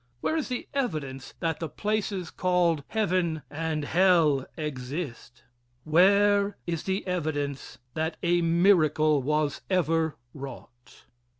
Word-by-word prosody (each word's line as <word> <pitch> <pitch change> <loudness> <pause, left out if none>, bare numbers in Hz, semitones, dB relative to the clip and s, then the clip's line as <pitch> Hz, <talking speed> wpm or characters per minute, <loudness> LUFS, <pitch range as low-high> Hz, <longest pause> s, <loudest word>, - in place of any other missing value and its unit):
Where 315 - 0
is 315 - -1
the 250 - -4
evidence 150 - -3
that 165 -2 -1
the 165 - -4
places 205 -4 -2
called 175 -4 +1
heaven 180 - 0
and 155 -1 -2
hell 165 -6 +3
exist? 130 -3 -5 0.4
Where 200 +5 +4
is 165 -2 -3
the 190 +1 -1
evidence 145 -6 -3 0.2
that 160 +1 -2
a 175 0 +3
miracle 165 -4 +4
was 150 +1 0
ever 165 -4 +1 0.2
wrought? 125 -3 -11
165 Hz, 115 wpm, -27 LUFS, 150-185 Hz, 0.4 s, Where